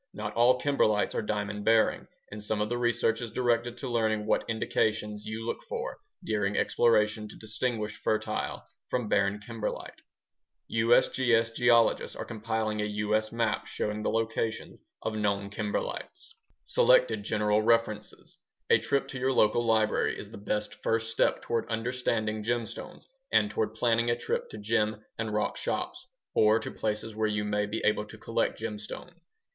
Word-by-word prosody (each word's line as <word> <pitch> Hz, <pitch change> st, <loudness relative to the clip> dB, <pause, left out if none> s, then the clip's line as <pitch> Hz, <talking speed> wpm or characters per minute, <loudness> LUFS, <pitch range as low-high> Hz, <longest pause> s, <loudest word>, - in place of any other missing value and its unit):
Not -, -, -4 dB
all 125 Hz, +2 st, +4 dB
kimberlites 110 Hz, -8 st, +2 dB
are -, -, 0 dB
diamond 105 Hz, -1 st, -3 dB
bearing, 115 Hz, 0 st, +3 dB, 0.2 s
and 105 Hz, 0 st, -7 dB
some 105 Hz, 0 st, -1 dB
of 105 Hz, 0 st, 0 dB
the 120 Hz, -, -1 dB
research 120 Hz, -1 st, +1 dB
is 120 Hz, -, -4 dB
directed 120 Hz, 0 st, 0 dB
to 135 Hz, -, -5 dB
learning 110 Hz, -3 st, 0 dB
what -, -, 0 dB
indications 105 Hz, -1 st, -1 dB
you 110 Hz, +1 st, -4 dB
look -, -, -3 dB
for -, -, -4 dB, 0.2 s
during 105 Hz, -2 st, 0 dB
exploration 110 Hz, -2 st, +2 dB
to 105 Hz, -, -11 dB
distinguish 110 Hz, 0 st, -2 dB
fertile 110 Hz, -, -1 dB, 0.3 s
from 125 Hz, -3 st, -1 dB
barren 100 Hz, 0 st, +2 dB
kimberlite. 110 Hz, +1 st, -5 dB, 0.7 s
USGS 115 Hz, 0 st, +3 dB
geologists 115 Hz, -1 st, +3 dB
are -, -, -5 dB
compiling 110 Hz, -1 st, -2 dB
a -, -, 0 dB
U.S. 105 Hz, +1 st, 0 dB
map 115 Hz, 0 st, 0 dB
showing 105 Hz, 0 st, -3 dB
the -, -, 0 dB
locations 115 Hz, 0 st, -2 dB, 0.2 s
of 110 Hz, -, -2 dB
known 100 Hz, -2 st, -1 dB
kimberlites. 105 Hz, -, -4 dB, 0.3 s
Selected -, -, +4 dB
general 105 Hz, -, +1 dB
references 110 Hz, -2 st, 0 dB, 0.3 s
A -, -, +7 dB
trip 140 Hz, -, 0 dB
to 130 Hz, -, -5 dB
your 130 Hz, +1 st, +1 dB
local 120 Hz, 0 st, +3 dB
library 110 Hz, -2 st, +2 dB
is -, -, -9 dB
the -, -, -9 dB
best 105 Hz, +1 st, -3 dB
first 115 Hz, 0 st, 0 dB
step 115 Hz, -, +1 dB
toward 115 Hz, -1 st, -1 dB
understanding 115 Hz, -2 st, -1 dB
gemstones 115 Hz, +1 st, -4 dB, 0.3 s
and -, -, +4 dB
toward 445 Hz, 0 st, -1 dB
planning 115 Hz, 0 st, +2 dB
a 120 Hz, -, +3 dB
trip 120 Hz, -, -2 dB
to -, -, -8 dB
gem 110 Hz, 0 st, 0 dB
and 110 Hz, -1 st, -2 dB
rock 105 Hz, 0 st, -1 dB
shops -, -, -3 dB, 0.3 s
or 110 Hz, +1 st, +5 dB
to 110 Hz, -, -4 dB
places 110 Hz, 0 st, -3 dB
where 110 Hz, 0 st, +1 dB
you 105 Hz, -1 st, -1 dB
may 105 Hz, 0 st, 0 dB
be 110 Hz, +2 st, -3 dB
able 105 Hz, 0 st, +2 dB
to 110 Hz, -, -12 dB
collect 115 Hz, +1 st, -1 dB
gemstones. 110 Hz, +9 st, -6 dB
110 Hz, 160 wpm, -29 LUFS, 105-115 Hz, 0.7 s, A